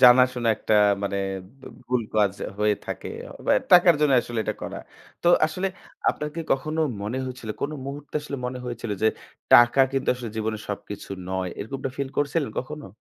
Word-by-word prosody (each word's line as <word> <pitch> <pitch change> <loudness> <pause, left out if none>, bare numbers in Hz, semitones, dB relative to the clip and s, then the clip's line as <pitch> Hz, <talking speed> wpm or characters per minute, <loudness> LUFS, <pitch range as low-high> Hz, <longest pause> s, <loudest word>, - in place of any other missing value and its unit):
জানাশোনা 125 -1 +6
একটা 110 - 0 0.3
মানে 100 0 -1 0.4
বু - - -13 0.2
ভুল 125 -1 +1
কাজ 105 -2 +3 0.3
হয়ে 105 0 +3
থাকে, - - -5 0.4
বা - - +3 0.2
টাকার 175 -2 +8
জন্যে 145 -3 +4
আসলে 120 -1 -5
এটা - - -1
করা। - - -5 0.4
তো - - -2 0.2
আসলে 185 +5 -2 0.4
আপনার 150 - -1
কি 165 - -3
কখনো 155 +4 -1 0.2
মনে 110 +5 -3
হয়েছিল, 125 -4 -6
কোন 145 - -1 0.2
মুহূর্তে 145 +1 -8
আসলে 140 -1 -5
মনে 125 0 -4
হয়েছিল 120 -2 -5
যে, - - +5 0.5
টাকা 120 +3 +8
কিন্তু 135 -1 -1
আসলে 120 -3 -6
জীবনে 110 0 -1
সবকিছু 105 0 -6 0.2
নয়? 95 -1 -1
এরকম 130 +7 -5
একটা 130 - -3
ফিল 140 -1 -1
করছিলেন 145 -2 0
কখনো? 150 +3 -5
125 Hz, 175 wpm, -25 LUFS, 110-145 Hz, 0.5 s, টাকার